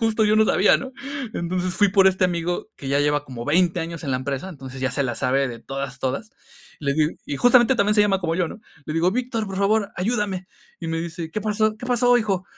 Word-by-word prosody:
Justo 225 -1 +2
yo 210 +1 +3
no 220 - +5
sabía, 205 -1 +4
¿no? 265 -1 -7 0.4
Entonces, 180 +1 -2
fui 205 -1 +4
por 195 0 +4
este 190 -1 +3
amigo 175 0 -1
que 135 - -7
ya 140 +1 +2
lleva 145 0 +1
como 120 -3 -7
20 175 +3 +2
años 165 0 -5
en 140 - -2
la 130 - +1
empresa, 140 +6 -4
entonces 135 -5 -9
ya 130 - 0
se 140 - -1
la 125 -3 -2
sabe 135 +3 +1
de 120 -1 -7
todas, 135 +1 -6
todas. 135 - -3 0.5
Le 140 -1 0
digo 155 0 +2
y 140 - -3
justamente 245 - +5
también 210 0 +2
se 210 - +5
llama 200 -2 +3
como 165 -2 -1
yo, 175 -2 0
¿no? 220 - -10 0.3
Le 155 - -4
digo: 170 +3 +3
"Víctor, 235 -2 -2
por 190 -1 -6
favor, 200 +1 +1
ayúdame". 195 -2 -1 0.3
Y 165 - -5
me 165 0 -2
dice: 165 -1 -5
"¿Qué 215 - -3
pasó?, 215 +1 0
¿qué 245 +2 -8
pasó, 245 0 +4
hijo?". 195 -5 -1
180 Hz, 245 wpm, -23 LUFS, 145-210 Hz, 0.5 s, no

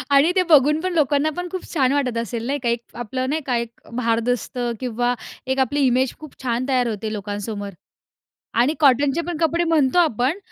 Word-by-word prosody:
आणि 285 +5 +5
ते 370 - +4
बघून 300 0 +5
पण 370 0 -2
लोकांना 295 -1 +2
पण 355 - -3
खूप 370 - -4
छान 265 -5 +2
वाटत 260 -5 0
असेल, 230 0 -3
नाही 285 +2 -1
का, 235 - +1
एक 235 0 0
आपलं 255 +2 -3
नाही 310 +3 -1
का, 250 -3 0
एक 235 0 -5
भारदस्त 235 +1 -1 0.2
किंवा 245 0 0 0.3
एक 265 +1 0
आपली 265 +3 +1
इमेज 255 +1 +2
खूप 305 -3 -11
छान 245 0 -1
तयार 250 -2 +2
होते 215 0 -3
लोकांसमोर. 205 0 -4 0.9
आणि 280 +6 +3
कॉटनचे 280 +2 +4
पण 350 -2 -3
कपडे 335 +1 +1
म्हणतो 320 -2 +2
आपण, 285 - +2
260 Hz, 190 wpm, -22 LUFS, 235-300 Hz, 0.9 s, आणि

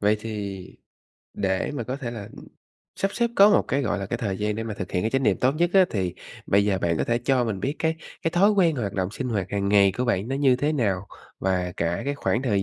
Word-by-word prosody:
Vậy 105 +1 +3
thì 100 -4 -5 0.7
để 95 +6 -1
mà 120 -5 -3
có 125 +4 -4
thể 125 -5 -5
là 105 -4 -7 0.7
sắp 195 - 0
xếp 235 -1 +1
có 200 +1 +8
một - - +4
cái, 140 +1 +1
gọi 105 -4 -1
là, 100 - -4
cái - - -2
thời 100 -4 -2
gian 105 0 -1
để 115 - -3
mà 110 -2 -4
thực 90 - -6
hiện 90 - 0
cái 110 - 0
chánh 135 0 +1
niệm - - +3
tốt 130 +2 +3
nhất 175 +1 +2
á, 190 -1 +7
thì 95 -4 -2 0.3
bây 100 +1 +3
giờ 100 -2 +1
bạn 85 -2 0
có - - +1
thể 120 0 +1
cho 125 0 +1
mình 100 -5 -3
biết 140 +7 -1
cái 160 0 0 0.3
cái 165 - +1
thói 195 +5 +4
quen 175 -7 +3
hoạt 105 -5 -2
động 95 -1 -2
sinh 125 +4 -4
hoạt 100 -5 -1
hàng 100 -1 -1
ngày 100 -2 +5
của 125 - +1
bạn 110 -1 0
nó 135 - -1
như 135 -3 +4
thế 150 +4 0
nào? 100 -8 0 0.3
Và 90 -2 -1
cả 85 +1 -1
cái 140 - -1
khoảng 130 -3 -1
thời 105 -6 +1
110 Hz, 270 wpm, -25 LUFS, 100-135 Hz, 0.7 s, có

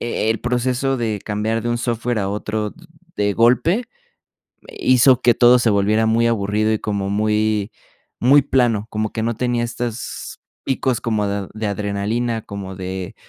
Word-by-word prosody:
e 115 -2 -1
el 115 - -1
proceso 125 +2 0
de 110 -4 -2
cambiar 110 +2 -1
de 120 - -2
un 120 - 0
software 120 -1 -1
a 95 - -1
otro 105 +1 -3 0.4
de 100 0 +1
golpe 125 - +3 1.0
hizo 130 0 +4
que 120 -3 +4
todo 125 0 +6
se 120 - +2
volviera 105 +2 +2
muy 115 +1 +2
aburrido 110 -1 +1
y 110 - -1
como 100 -2 -2
muy 105 0 0 0.5
muy 140 +4 +6
plano, 120 -6 +1
como 110 0 -2
que 110 - -2
no 115 0 -1
tenía 120 0 0
estos 120 0 -5 0.2
picos 130 -2 0
como 110 -3 0
de 100 -1 -3
de 110 0 -3
adrenalina, 105 +4 -2
como 100 -2 -7
de, 95 -1 -6
110 Hz, 165 wpm, -20 LUFS, 105-120 Hz, 1.0 s, todo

